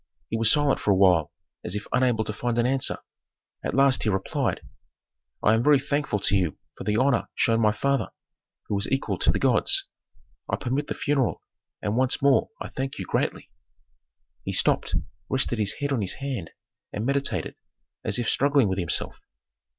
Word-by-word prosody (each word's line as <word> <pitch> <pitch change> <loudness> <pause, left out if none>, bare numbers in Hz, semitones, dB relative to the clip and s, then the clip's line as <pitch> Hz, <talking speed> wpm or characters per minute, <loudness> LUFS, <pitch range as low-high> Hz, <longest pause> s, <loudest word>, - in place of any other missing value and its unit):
He 115 - -1
was 115 -1 +4
silent 145 -2 +2
for - - -2
a 100 - +5
while 90 -5 +4 0.3
as 90 - -3
if 105 - -4
unable 125 -3 +2
to 105 - -4
find 120 +2 -2
an 120 - +2
answer; 130 +1 +2 0.7
at - - -2
last 135 -1 +4
he 110 - 0
replied, 95 -1 -1 0.8
"I 105 - +5
am 110 - +3
very 145 0 +5
thankful 140 -4 -1
to 100 - +2
you 90 -5 0 0.2
for - - -9
the 105 +1 +1
honor 130 -1 +2
shown 115 0 +2
my 105 -1 +4
father, 135 +3 0 0.5
who 105 - -3
is 100 - -2
equal 115 -8 -1
to - - +3
the - - -1
gods. - - +2 0.6
I - - +1
permit 135 +4 -2
the - - -3
funeral, 140 -4 0 0.4
and 105 - -1
once 130 +2 +2
more 140 -1 +3
I - - -6
thank 135 0 -4
you - - -5
greatly." - - -2 0.9
He - - -3
stopped, - - +1 0.3
rested 130 -3 0
his 105 -2 +1
head 145 -1 -3
on 120 - 0
his 95 - -1
hand 130 -11 -5 0.4
and 105 - -3
meditated, 140 +1 -1 0.5
as - - 0
if 120 -2 -1
struggling 140 -3 +3
with 95 0 -1
himself. 85 - -1
120 Hz, 185 wpm, -25 LUFS, 105-135 Hz, 0.9 s, a